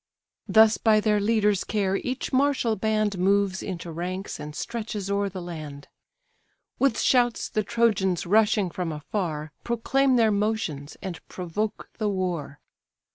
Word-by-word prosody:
Thus 220 Hz, 0 st, +5 dB
by 220 Hz, -2 st, +4 dB
their 210 Hz, -1 st, +2 dB
leaders' 210 Hz, -2 st, +2 dB
care 195 Hz, -2 st, 0 dB
each 255 Hz, +4 st, -4 dB
martial 260 Hz, -4 st, +2 dB
band 215 Hz, -2 st, 0 dB
Moves 195 Hz, 0 st, +2 dB
into 175 Hz, -3 st, -5 dB
ranks, 180 Hz, +4 st, -4 dB
and 150 Hz, 0 st, -7 dB
stretches 215 Hz, -3 st, -4 dB
o'er 200 Hz, 0 st, +1 dB
the 185 Hz, -1 st, -7 dB
land. 155 Hz, -5 st, -8 dB, 0.9 s
With 270 Hz, -5 st, +2 dB
shouts 245 Hz, -2 st, +2 dB
the 215 Hz, -, -1 dB
Trojans, 210 Hz, -5 st, +1 dB
rushing 205 Hz, -1 st, +3 dB
from 175 Hz, -2 st, -3 dB
afar, 155 Hz, -1 st, -3 dB
Proclaim 260 Hz, +3 st, +2 dB
their 225 Hz, -3 st, +4 dB
motions, 200 Hz, -9 st, -2 dB
and 180 Hz, -4 st, -6 dB
provoke 190 Hz, +4 st, -4 dB
the 215 Hz, -2 st, +1 dB
war. 175 Hz, -7 st, -3 dB
200 Hz, 135 wpm, -26 LUFS, 180-220 Hz, 0.9 s, Thus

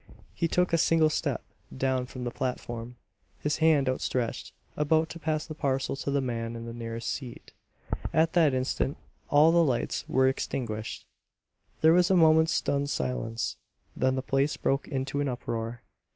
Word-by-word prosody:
He 170 Hz, -, 0 dB
took 180 Hz, +1 st, +1 dB
a 165 Hz, -, +4 dB
single 160 Hz, -1 st, +4 dB
step -, -, -1 dB, 0.3 s
down 130 Hz, -1 st, 0 dB
from 125 Hz, 0 st, -7 dB
the 120 Hz, -, -2 dB
platform, 120 Hz, -2 st, -4 dB, 0.4 s
his 150 Hz, 0 st, -1 dB
hand 160 Hz, -4 st, +4 dB
outstretched, 130 Hz, -2 st, -2 dB, 0.2 s
about 160 Hz, +2 st, +2 dB
to 170 Hz, -, -8 dB
pass 155 Hz, -1 st, -1 dB
the 155 Hz, -, -7 dB
parcel 135 Hz, -4 st, -1 dB
to 140 Hz, -, -3 dB
the 140 Hz, 0 st, +2 dB
man 115 Hz, -2 st, -3 dB
in 115 Hz, 0 st, -6 dB
the 115 Hz, -, -6 dB
nearest 115 Hz, 0 st, -5 dB
seat. 125 Hz, -4 st, -6 dB, 0.6 s
At 160 Hz, +1 st, +2 dB
that 155 Hz, -6 st, +4 dB
instant 130 Hz, +2 st, -1 dB, 0.3 s
all 150 Hz, +3 st, +6 dB
the 170 Hz, 0 st, +5 dB
lights 130 Hz, -6 st, -1 dB
were 130 Hz, 0 st, +4 dB
extinguished. 110 Hz, -4 st, -3 dB, 0.8 s
There 160 Hz, +1 st, +6 dB
was 180 Hz, 0 st, +4 dB
a 190 Hz, -, +4 dB
moment's 160 Hz, -1 st, +5 dB
stunned 140 Hz, 0 st, 0 dB
silence; 65 Hz, -, -2 dB, 0.4 s
then 130 Hz, 0 st, +1 dB
the 130 Hz, -, -2 dB
place 135 Hz, +2 st, +1 dB
broke 135 Hz, 0 st, 0 dB
into 135 Hz, +1 st, -2 dB
an 145 Hz, -, 0 dB
uproar. 115 Hz, -1 st, -4 dB
135 Hz, 165 wpm, -28 LUFS, 120-155 Hz, 0.8 s, all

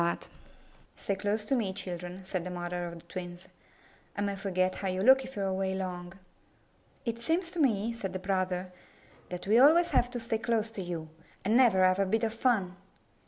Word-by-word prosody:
''Stay 200 Hz, -, -2 dB
close 205 Hz, +2 st, -1 dB
to 240 Hz, -, -1 dB
me, 225 Hz, -7 st, +1 dB
children,'* 180 Hz, -1 st, -5 dB
said 185 Hz, -2 st, -3 dB
the 180 Hz, -, -5 dB
mother 175 Hz, 0 st, -3 dB
of 170 Hz, -, -7 dB
the 170 Hz, -, -11 dB
twins. 175 Hz, +1 st, -8 dB, 0.7 s
"I -, -, -1 dB
may 200 Hz, -1 st, -1 dB
forget 185 Hz, -1 st, 0 dB
how 195 Hz, -, -1 dB
you 185 Hz, 0 st, -1 dB
look 265 Hz, +4 st, +6 dB
if 260 Hz, 0 st, -10 dB
you 200 Hz, -, -2 dB
are -, -, 0 dB
away 190 Hz, 0 st, -1 dB
long.'' 180 Hz, -2 st, -4 dB, 0.9 s
"It 230 Hz, -1 st, -3 dB
seems 335 Hz, +6 st, 0 dB
to 350 Hz, -, -5 dB
me," 230 Hz, -5 st, +2 dB
said 205 Hz, -5 st, -4 dB
the -, -, -1 dB
brother, 185 Hz, -1 st, -1 dB, 0.6 s
"that 180 Hz, -1 st, -6 dB
we 215 Hz, +4 st, +5 dB
always 325 Hz, +6 st, +6 dB
have 245 Hz, -, +3 dB
to 245 Hz, -1 st, -4 dB
stay 225 Hz, -1 st, -2 dB
close 225 Hz, -1 st, 0 dB
to 210 Hz, -, -5 dB
you. 170 Hz, -3 st, -5 dB, 0.4 s
I -, -, 0 dB
never 225 Hz, -5 st, +5 dB
have 185 Hz, +1 st, +3 dB
a 195 Hz, -, +2 dB
bit 225 Hz, +4 st, +1 dB
of 220 Hz, -1 st, 0 dB
fun!" 220 Hz, -7 st, +1 dB
195 Hz, 205 wpm, -30 LUFS, 185-230 Hz, 0.9 s, look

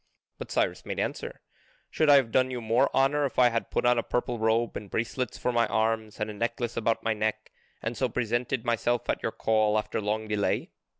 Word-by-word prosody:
But -, -, -7 dB
Cyrus -, -, 0 dB
made -, -, -4 dB
answer: 485 Hz, +2 st, -4 dB, 0.5 s
"Should 155 Hz, -2 st, +2 dB
I 145 Hz, -, +9 dB
have 130 Hz, -5 st, +3 dB
done 130 Hz, +1 st, +3 dB
you 125 Hz, -1 st, -4 dB
more 120 Hz, +4 st, +2 dB
honour 140 Hz, +2 st, +2 dB
if -, -, -13 dB
I 125 Hz, -1 st, +6 dB
had 115 Hz, -1 st, -2 dB
put -, -, -1 dB
on 120 Hz, -1 st, +4 dB
a -, -, +2 dB
purple 120 Hz, 0 st, -2 dB
robe, 110 Hz, +1 st, +1 dB
and 105 Hz, -, -6 dB
bracelets 120 Hz, +4 st, -2 dB
for 125 Hz, -, -1 dB
my 120 Hz, -1 st, +2 dB
arms, 110 Hz, -1 st, -1 dB
and 105 Hz, -, -1 dB
a 105 Hz, -, -6 dB
necklace 115 Hz, +2 st, -2 dB
about 115 Hz, 0 st, 0 dB
my 115 Hz, -, +1 dB
neck, 110 Hz, 0 st, -2 dB, 0.3 s
and 115 Hz, +2 st, -2 dB
so 130 Hz, +1 st, 0 dB
presented 120 Hz, +1 st, -1 dB
myself 120 Hz, 0 st, 0 dB
at -, -, -4 dB
your -, -, -1 dB
call 110 Hz, -1 st, +2 dB
after 110 Hz, -, -2 dB
long 110 Hz, +1 st, -2 dB
delay? 105 Hz, -1 st, -1 dB
115 Hz, 220 wpm, -28 LUFS, 110-125 Hz, 0.5 s, I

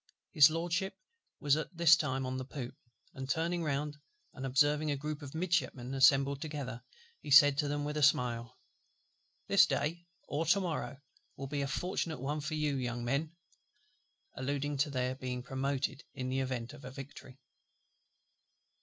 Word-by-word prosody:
His 150 Hz, -3 st, +8 dB
LORDSHIP 175 Hz, +4 st, -2 dB, 0.4 s
was 145 Hz, -1 st, +3 dB
at 155 Hz, +3 st, -5 dB
this 170 Hz, -1 st, +7 dB
time 135 Hz, -5 st, -2 dB
on 130 Hz, 0 st, -3 dB
the 130 Hz, -, -3 dB
poop; 130 Hz, -2 st, -6 dB, 0.4 s
and 135 Hz, 0 st, -7 dB
turning 170 Hz, +4 st, 0 dB
round, 150 Hz, 0 st, -2 dB, 0.4 s
and 135 Hz, 0 st, -5 dB
observing 145 Hz, +3 st, +2 dB
a 145 Hz, -, 0 dB
group 150 Hz, +2 st, -5 dB
of 140 Hz, +1 st, -9 dB
Midshipmen 160 Hz, -7 st, -1 dB
assembled 135 Hz, +1 st, +4 dB
together, 140 Hz, -6 st, -5 dB, 0.4 s
he -, -, -9 dB
said 145 Hz, 0 st, +8 dB
to 150 Hz, -, +1 dB
them 145 Hz, 0 st, -2 dB
with 150 Hz, +1 st, -3 dB
a -, -, 0 dB
smile, 125 Hz, -3 st, +2 dB, 0.9 s
"This 190 Hz, -2 st, +6 dB
day 170 Hz, +4 st, -2 dB, 0.2 s
or 155 Hz, +3 st, -2 dB
to 190 Hz, +5 st, +5 dB
morrow 170 Hz, -6 st, -3 dB, 0.4 s
will 135 Hz, -, -6 dB
be 140 Hz, +1 st, -3 dB
a 140 Hz, -, -1 dB
fortunate 165 Hz, 0 st, -2 dB
one 145 Hz, +4 st, -2 dB
for 155 Hz, +2 st, -3 dB
you, 150 Hz, -2 st, 0 dB
young 120 Hz, -2 st, -3 dB
men," 150 Hz, +6 st, -1 dB, 1.0 s
alluding 140 Hz, +2 st, -2 dB
to 145 Hz, +2 st, +1 dB
their 130 Hz, -2 st, -1 dB
being 125 Hz, -1 st, -5 dB
promoted 135 Hz, +2 st, -2 dB
in 130 Hz, -1 st, -3 dB
the 130 Hz, +1 st, 0 dB
event 130 Hz, -1 st, -3 dB
of 145 Hz, -2 st, -13 dB
a 130 Hz, -, -7 dB
victory. 135 Hz, 0 st, -11 dB
140 Hz, 165 wpm, -32 LUFS, 130-155 Hz, 1.0 s, His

